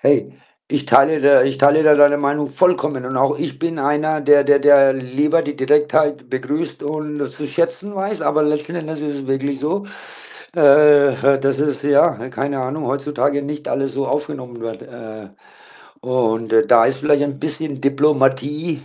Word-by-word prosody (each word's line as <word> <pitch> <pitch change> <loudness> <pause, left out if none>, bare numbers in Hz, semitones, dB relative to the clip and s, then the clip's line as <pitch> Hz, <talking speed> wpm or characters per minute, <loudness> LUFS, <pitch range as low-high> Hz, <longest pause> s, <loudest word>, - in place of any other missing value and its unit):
Hey, - - +1 0.4
ich 145 0 -2
teile 150 +2 +3
da 140 0 +5
ich 135 0 -2
teile 145 +3 +4
da 155 -1 +5
deine 145 0 +4
Meinung 145 0 -2
vollkommen, 150 -5 0
und 130 0 -5
auch 140 +3 0
ich - - -5
bin 165 -2 -4
einer, 150 +2 -1
der 145 0 +4
der 145 0 +4
der 140 -1 +5
lieber 145 +5 -1
die 145 0 -6
Direktheit 150 0 0
begrüßt 140 +5 -4
und 150 -1 -5
zu 150 - -7
schätzen 170 +6 -3
weiß, 200 +2 -4
aber 155 0 +1
letzten 150 +3 -2
Endes 160 -2 -6
ist 145 -1 -4
es 135 - -11
wirklich 135 +1 -3
so, 190 +7 -3 0.7
äh, 145 -1 +5 0.2
äh, - - -1
dass 135 0 -1
es, 145 -1 -2
ja, 145 +2 +2
ne, 125 +3 -8
keine 135 +1 -4
Ahnung, 145 +4 -4
heutzutage 140 +1 -2
nicht 150 +1 -7
alles 135 -1 -3
so 140 0 -3
aufgenommen 135 -5 -5
wird, 115 -1 -7
äh, 110 -4 -12 0.7
und 115 -3 -2
da 115 - +5
da 115 -2 +4
ist 135 - -1
vielleicht 145 -1 +1
ein 140 -1 -5
bisschen 150 -3 -1
Diplomatie 140 +2 0
145 Hz, 180 wpm, -18 LUFS, 135-150 Hz, 0.7 s, da